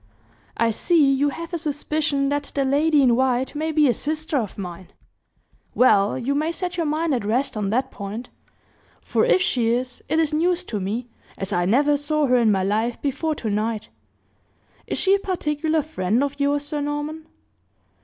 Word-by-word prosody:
"I 230 0 +2
see! 290 +3 +3
you 285 +2 +2
have 335 +4 -7
a 340 - -1
suspicion 295 -2 -1
that 290 0 -2
the 275 -1 +1
lady 290 +2 +3
in 245 -3 +4
white 260 0 +1
may 310 +2 -2
be 305 -1 +4
a 245 - +3
sister 310 +5 -3
of 225 -8 -2
mine. 180 -2 -7 0.9
Well, 210 -4 +4
you 260 +2 -1
may 305 +3 0
set 360 +1 -4
your 335 -3 -1
mind 310 +1 0
at 245 - -1
rest 240 +6 0
on 205 -2 -1
that 250 +6 0
point 210 +5 -7 0.7
for - - 0
if 370 - +3
she 245 -9 +1
is, 245 +2 -2
it 315 - +1
is 320 -2 +1
news 350 +3 +1
to 215 - -4
me, 215 +6 -3 0.3
as 195 +1 -3
I 175 0 +1
never 285 +9 +3
saw 300 +1 0
her 250 -2 +3
in 230 -3 +4
my 190 -2 +1
life 220 +4 0
before 300 +3 -1
tonight. 215 -2 -2 1.0
Is - - -2
she 385 - +3
a 400 - +3
particular 315 -4 -1
friend 230 -4 0
of 285 0 -3
yours, 285 +1 +1
Sir 295 0 -3
Norman?" 295 +2 -4
280 Hz, 185 wpm, -23 LUFS, 230-310 Hz, 1.0 s, in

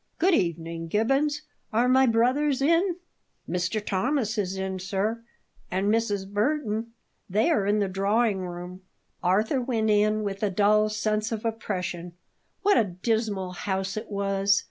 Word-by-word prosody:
"Good 370 +3 +3
evening, 165 - -1
Gibbons; 275 - +1 0.3
are 235 +3 +2
my 260 +1 +5
brothers 255 +5 +2
in?" 335 +6 +3 0.5
"Mr. 180 +4 -1
Thomas 235 +3 0
is 195 -3 -2
in, 190 0 -3
sir; 200 +4 -2 0.5
and 195 +3 +1
Mrs. 205 -4 0
Burton. 225 +1 -1 0.4
They 215 - +2
are 205 -11 +1
in 205 +1 +3
the 205 -2 +1
drawing 200 +2 +1
room." 180 +1 -8 0.4
Arthur 210 +9 +2
went 225 -3 0
in 215 +1 +2
with 195 -1 -4
a 210 - +2
dull 210 +2 +3
sense 215 +1 -1
of 225 0 -4
oppression. 180 -6 -3 0.5
What 405 0 +5
a - - +4
dismal 200 0 -1
house 190 +1 -3
it 215 +1 -5
was! 200 0 +2
210 Hz, 145 wpm, -26 LUFS, 190-230 Hz, 0.5 s, my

